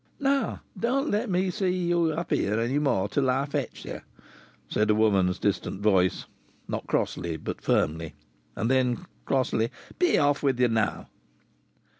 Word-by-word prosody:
"Now 275 -1 0
don't 255 +8 0
let 215 +3 0
me 185 0 +1
see 185 +1 0
ye 175 -2 +1
up 170 +2 -4
here 105 +3 +1
any 125 +5 +1
more 120 -10 +1
till 130 +5 +1
I 135 +2 +1
fetch 145 -3 -4
ye!" - - -6 0.7
said 105 0 +1
a 105 - +5
woman's 100 -4 +3
distant 100 -1 -1
voice 95 -4 +2 0.4
not - - -4
crossly, 85 -2 -1
but - - -6
firmly. 80 +1 0 0.4
And 115 +3 0
then, 125 -3 +1 0.2
crossly: 120 -3 +1 0.3
"Be 360 -1 +4
off 145 -1 +2
with 135 -3 +1
ye 125 -1 +4
now!" 110 -2 0
130 Hz, 155 wpm, -27 LUFS, 105-175 Hz, 0.7 s, a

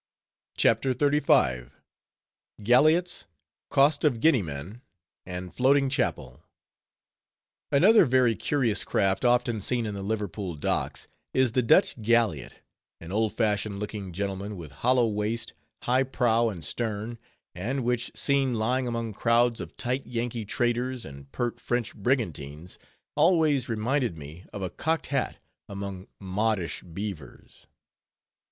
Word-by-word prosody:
CHAPTER 125 +3 +3
XXXV. 125 - +2 0.9
GALLIOTS, 155 - +3 0.4
COAST 145 +1 +3
OF 135 -7 +2
GUINEA 135 -3 +4
MAN, 80 - -7 0.5
AND 90 -2 -6
FLOATING 135 +5 +3
CHAPEL 75 - -2 1.3
Another 190 +8 +6
very 125 -3 +3
curious 125 -6 0
craft 95 -1 +1
often 120 -3 +2
seen 120 +3 0
in 105 - -3
the 100 - -5
Liverpool 100 -3 -3
docks, 75 - -2 0.3
is 130 -2 +3
the 125 - +2
Dutch 115 0 +3
galliot, 110 - +1 0.4
an 80 +2 -9
old 110 +1 +1
fashioned 105 -2 0
looking 105 -2 -5
gentleman, 100 +2 -4
with 80 -5 -9
hollow 125 - +2
waist, 110 +2 -2 0.3
high 125 +2 +2
prow 120 -3 +2
and 85 -8 -4
stern, 110 +4 -3 0.3
and 125 +9 -3
which, 120 0 -1
seen 135 -3 +1
lying 125 +4 0
among 115 -2 -3
crowds 115 +1 +2
of 85 - -9
tight 125 +3 -2
Yankee 120 -2 -3
traders, 120 +3 -1
and 70 0 -11
pert 120 - -3
French 120 -1 -2
brigantines, 90 - -3 0.4
always 155 -5 +3
reminded 115 - 0
me 75 +5 -10
of 100 - -6
a 90 - -3
cocked 160 +1 -1
hat 135 - -1 0.3
among 100 -2 -6
modish 100 -1 -1
beavers. 90 -3 -8
115 Hz, 125 wpm, -27 LUFS, 95-125 Hz, 1.3 s, Another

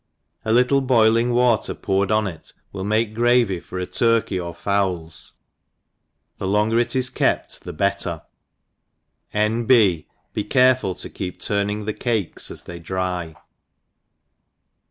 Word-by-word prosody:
A 110 - -1
little 125 +4 +4
boiling 115 -2 +3
water 120 -3 +2
poured 95 0 0
on 110 0 +2
it 85 -5 -7 0.2
will 95 -1 -5
make 110 +2 0
gravy 120 -5 +3
for 90 - -7
ft 90 - -5
turkey 115 -6 +2
or 85 -1 -4
fowls^ 90 -3 -2 1.1
the 95 - -2
longer 105 +3 +2
it 120 +1 0
is 130 -1 +1
kept - - 0
the - - -5
bet* - - 0
tef - - -4 0.6
> - - -51
N. 110 +3 0
B. 105 -10 +4 0.3
Be 105 - -1
careful 130 -7 +3
to - - -6
keep 90 -2 -6
turning 105 +1 -1
the 110 - -2
cakes 110 -7 -2
as - - -9
they 85 -1 -8
dry. 90 -1 -3
105 Hz, 145 wpm, -22 LUFS, 95-120 Hz, 1.1 s, little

